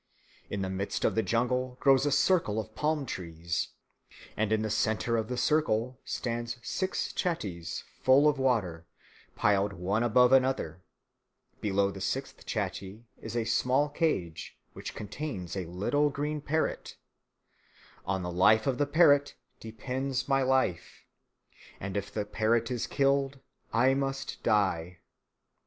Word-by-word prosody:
In 100 Hz, -1 st, -2 dB
the 95 Hz, -, -2 dB
midst 95 Hz, +1 st, -2 dB
of -, -, +2 dB
the 110 Hz, -, +2 dB
jungle 125 Hz, +2 st, 0 dB
grows 135 Hz, +1 st, +4 dB
a -, -, +1 dB
circle 145 Hz, -, +2 dB
of 110 Hz, 0 st, -6 dB
palm 150 Hz, +2 st, 0 dB
trees, 85 Hz, -5 st, -3 dB, 0.7 s
and 110 Hz, 0 st, 0 dB
in 110 Hz, 0 st, +2 dB
the 110 Hz, -, -1 dB
centre 110 Hz, +2 st, +1 dB
of 110 Hz, -1 st, -1 dB
the 125 Hz, +1 st, -3 dB
circle 125 Hz, -3 st, +1 dB
stand 120 Hz, -1 st, -3 dB
six 185 Hz, +8 st, -2 dB
chattees 100 Hz, -, -3 dB, 0.2 s
full 135 Hz, +3 st, +6 dB
of 150 Hz, -2 st, +2 dB
water, 95 Hz, -11 st, 0 dB, 0.5 s
piled 100 Hz, 0 st, +2 dB
one 100 Hz, +4 st, -1 dB
above 125 Hz, +1 st, +4 dB
another: 130 Hz, -10 st, +2 dB, 0.8 s
below 100 Hz, -1 st, +1 dB
the 95 Hz, -, -9 dB
sixth 135 Hz, +7 st, -4 dB
chattee 100 Hz, +1 st, -4 dB
is 115 Hz, +1 st, -5 dB
a 115 Hz, -, 0 dB
small 130 Hz, +6 st, +2 dB
cage, 120 Hz, -, -2 dB, 0.2 s
which -, -, -7 dB
contains 100 Hz, -, -5 dB
a 95 Hz, -3 st, -3 dB
little 105 Hz, -, +1 dB
green 150 Hz, +1 st, -3 dB
parrot; 155 Hz, +2 st, -2 dB, 1.1 s
on 95 Hz, 0 st, -2 dB
the 90 Hz, -, -3 dB
life 110 Hz, +5 st, +4 dB
of 135 Hz, -1 st, 0 dB
the 145 Hz, -, +2 dB
parrot 145 Hz, -2 st, +4 dB, 0.2 s
depends 130 Hz, +4 st, -3 dB
my 135 Hz, -1 st, +3 dB
life; 130 Hz, -9 st, 0 dB, 0.8 s
and 95 Hz, 0 st, -5 dB
if 100 Hz, 0 st, -3 dB
the 105 Hz, 0 st, -2 dB
parrot 115 Hz, +3 st, +1 dB
is 120 Hz, -2 st, -2 dB
killed 140 Hz, -1 st, +1 dB, 0.3 s
I 125 Hz, +4 st, +4 dB
must 135 Hz, 0 st, -3 dB
die. 90 Hz, -4 st, +1 dB
115 Hz, 145 wpm, -29 LUFS, 100-135 Hz, 1.1 s, full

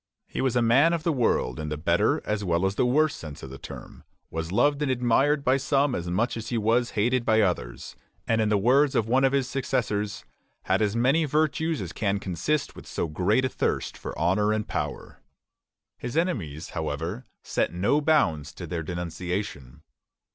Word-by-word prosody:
He -, -, -4 dB
was 130 Hz, -3 st, +1 dB
a 120 Hz, -, +3 dB
man 135 Hz, +9 st, +5 dB
of 165 Hz, -2 st, -1 dB
the 170 Hz, -2 st, +1 dB
world 110 Hz, -, +1 dB
in 75 Hz, -1 st, -4 dB
the 75 Hz, -, -3 dB
better 80 Hz, -, +1 dB
as 105 Hz, -1 st, -1 dB
well 85 Hz, 0 st, +1 dB
as 95 Hz, -, +1 dB
the 125 Hz, -, +1 dB
worse 150 Hz, +4 st, +3 dB
sense 75 Hz, -3 st, -9 dB
of 65 Hz, -, -8 dB
the 65 Hz, -, -9 dB
term; -, -, -10 dB, 0.3 s
was 80 Hz, +1 st, -4 dB
loved 145 Hz, +8 st, +2 dB
and 145 Hz, -, 0 dB
admired 130 Hz, +4 st, +2 dB
by 130 Hz, +1 st, +3 dB
some 135 Hz, 0 st, +1 dB
as 85 Hz, -4 st, -3 dB
much 110 Hz, +8 st, 0 dB
as 115 Hz, -1 st, -5 dB
he 120 Hz, -, -1 dB
was 115 Hz, +3 st, +1 dB
hated 120 Hz, +4 st, +2 dB
by 110 Hz, -1 st, +3 dB
others; 85 Hz, -, -2 dB, 0.3 s
and 115 Hz, -1 st, +2 dB
in 110 Hz, -, +1 dB
the 105 Hz, -, +3 dB
words 130 Hz, +7 st, +3 dB
of 110 Hz, -, +2 dB
one 130 Hz, +3 st, +3 dB
of 135 Hz, -, +4 dB
his 135 Hz, -2 st, +1 dB
successors, 110 Hz, -7 st, -2 dB, 0.4 s
"had 95 Hz, +3 st, +1 dB
as 105 Hz, 0 st, +1 dB
many 135 Hz, +7 st, +3 dB
virtues 155 Hz, +1 st, 0 dB
as 85 Hz, -3 st, -6 dB
can 100 Hz, -2 st, 0 dB
consist 100 Hz, -, -2 dB
with -, -, -11 dB
so -, -, -2 dB
great 95 Hz, +11 st, +1 dB
a -, -, 0 dB
thirst -, -, -2 dB
for -, -, -7 dB
honor 105 Hz, +3 st, +2 dB
and 110 Hz, 0 st, -1 dB
power." -, -, -5 dB, 0.8 s
His 125 Hz, +5 st, -4 dB
enemies, 90 Hz, -, -2 dB
however, 80 Hz, -, -4 dB, 0.2 s
set -, -, 0 dB
no 100 Hz, -, +1 dB
bounds 85 Hz, -, +2 dB
to -, -, -7 dB
their 85 Hz, -2 st, -3 dB
denunciation. 85 Hz, -4 st, -5 dB
110 Hz, 200 wpm, -26 LUFS, 90-135 Hz, 0.8 s, man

